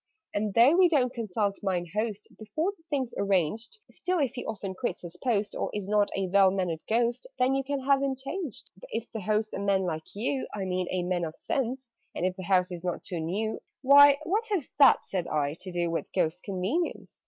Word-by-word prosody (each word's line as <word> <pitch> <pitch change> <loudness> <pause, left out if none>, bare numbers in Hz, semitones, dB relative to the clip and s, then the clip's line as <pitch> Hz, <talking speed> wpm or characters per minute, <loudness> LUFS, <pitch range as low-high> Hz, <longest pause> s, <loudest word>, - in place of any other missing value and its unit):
"And, 205 -1 -1
though 245 +7 +7
we 370 -2 +6
don't 260 -6 +2
consult 210 -4 -1
'Mine 185 -4 -1
Host' 215 -1 -2
Before 220 - -1
the 330 - -29
thing's 265 -5 -1
arranged, 200 - 0
Still, 365 0 -1
if 275 -6 +1
he 250 - -5
often 200 -3 -5
quits 240 +1 -4
his 175 0 -8
post, 215 -5 +1
Or - - -2
is 205 -2 -3
not 205 0 +3
a 195 - 0
well 195 +1 +5
mannered 180 -4 -1
Ghost, 235 +2 +1
Then 255 +1 +3
you 270 0 0
can 280 0 -2
have 275 +1 +3
him 275 -1 0
changed. 275 - -6
"But - - -13
if 225 +1 -4
the 220 - -5
host's 215 +2 0
a - - -3
man 200 -1 +2
like 160 -1 -4
you 260 +6 -1
I 195 -2 -3
mean 185 -1 -1
a 185 -1 -1
man 175 -1 -1
of 160 -1 -4
sense; 260 0 -2 0.3
And - - -1
if 185 0 0
the 190 - -7
house 185 -1 +2
is 175 -1 -6
not 180 -1 -3
too 175 - -4
new 200 +7 -2
" - - -61
"Why, 280 +1 +8
what 420 +8 0
has 390 - -1
that," 275 -2 +7
said 180 -3 -3
I, 145 -1 0
"to 185 - -6
do 175 -1 -1
With 165 - -3
Ghost's 175 -1 0
convenience?" 200 - -3
210 Hz, 225 wpm, -28 LUFS, 185-265 Hz, 0.3 s, Why